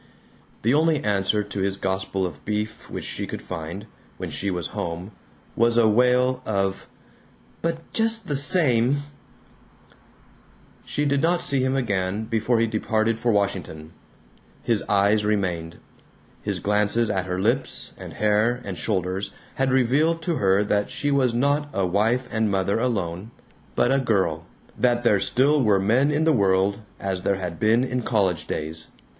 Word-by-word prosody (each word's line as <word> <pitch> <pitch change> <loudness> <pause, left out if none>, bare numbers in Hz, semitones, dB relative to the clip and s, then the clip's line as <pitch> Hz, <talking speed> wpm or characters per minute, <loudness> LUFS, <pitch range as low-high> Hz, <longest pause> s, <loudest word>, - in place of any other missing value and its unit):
The 115 +4 +3
only 155 0 +2
answer 105 0 +1
to 100 0 -6
his 95 0 0
gospel 95 0 -2
of 80 -5 -7
beef 105 0 -4
which - - -5
she - - -4
could - - -6
find, 85 +3 -6 0.3
when - - -5
she 100 - -2
was 90 -4 -3
home, 85 +4 -5 0.4
was 115 0 +3
a 115 -2 +5
wail 125 +3 +3
of 95 -2 -1 0.7
"But 165 0 -4
just 225 -2 +1
the 145 - -1
same 140 -3 +2 0.9
" - - -30
She 145 - -1
did 140 -1 +1
not 170 +2 +2
see 135 -2 0
him 130 +1 +1
again 100 -5 -1
before 115 +1 +1
he 115 - +3
departed 110 0 0
for 120 - +1
Washington. 95 -6 -2 0.7
His 115 -3 +1
eyes 105 +1 +3
remained. 90 -6 -1 0.6
His - - -2
glances 105 +3 +1
at 95 -1 -2
her 90 0 -2
lips 120 +7 -1
and - - -9
hair 110 +3 +2
and 95 -3 -5
shoulders 95 -1 -1 0.2
had 135 0 0
revealed 145 +6 +2
to 165 -2 -1
her 95 0 +3
that 105 0 0
she 145 - -2
was 130 -4 +2
not 145 +4 +1
a 100 - +1
wife 110 +7 +1
and 110 -1 +1
mother 100 +2 0
alone, 100 -5 -2 0.5
but - - +2
a 135 - +3
girl; 95 - 0 0.3
that 120 -1 +1
there 105 -4 +4
still 140 +8 +3
were 105 -5 +3
men 120 +9 +3
in 150 +1 +1
the 160 0 +4
world, 100 -1 +2 0.2
as 95 -2 -2
there 100 - +1
had 90 -3 -5
been 115 +3 +3
in 125 -1 -2
college 100 -8 0
days. 80 +1 -4
110 Hz, 160 wpm, -24 LUFS, 95-125 Hz, 0.9 s, a